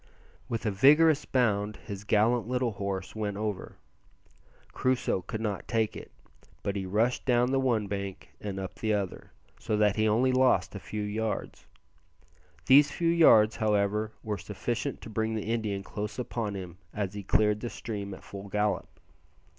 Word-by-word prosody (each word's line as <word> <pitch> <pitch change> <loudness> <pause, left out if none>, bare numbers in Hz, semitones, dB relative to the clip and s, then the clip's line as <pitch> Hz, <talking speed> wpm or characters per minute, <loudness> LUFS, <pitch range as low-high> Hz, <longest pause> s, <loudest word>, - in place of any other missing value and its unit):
With 115 0 -3
a 105 - +2
vigorous 150 +8 +5
bound 105 -5 +1
his 100 -2 -8
gallant 110 +2 +2
little 125 -1 0
horse 100 -1 -4
went 105 -2 -3
over. 105 -3 -4 0.9
Crusoe 130 -7 0
could 105 +5 -5
not 105 -3 -3
take 110 -2 0
it, - - -9 0.5
but 100 - -2
he 95 -2 -3
rushed 110 +6 +1
down 125 0 +2
the 135 - +2
one 120 -5 +1
bank 100 -1 -5
and 100 -2 -4
up 95 -1 -5
the 110 -1 0
other, 100 -3 -4 0.3
so 105 - -1
that 105 -1 +3
he 110 0 +3
only 120 +5 +3
lost 130 -7 +3
a 100 - -6
few 105 +2 -5
yards. 110 +1 -3 1.0
These 145 +2 +7
few 170 -1 0
yards, 115 -10 +6
however, 105 0 +1
were 105 -2 -3
sufficient 120 +6 -3
to - - -9
bring 110 +1 -1
the 110 +1 -2
Indian 105 -4 -2
close 105 +2 -5
upon 115 -4 -3
him 90 -2 -8
as 100 -3 -3
he 100 - -5
cleared 105 +2 +2
the 120 - -4
stream 100 -5 -5
at - - -15
full 100 0 -9
gallop. 105 +1 -1
105 Hz, 170 wpm, -29 LUFS, 100-120 Hz, 1.0 s, These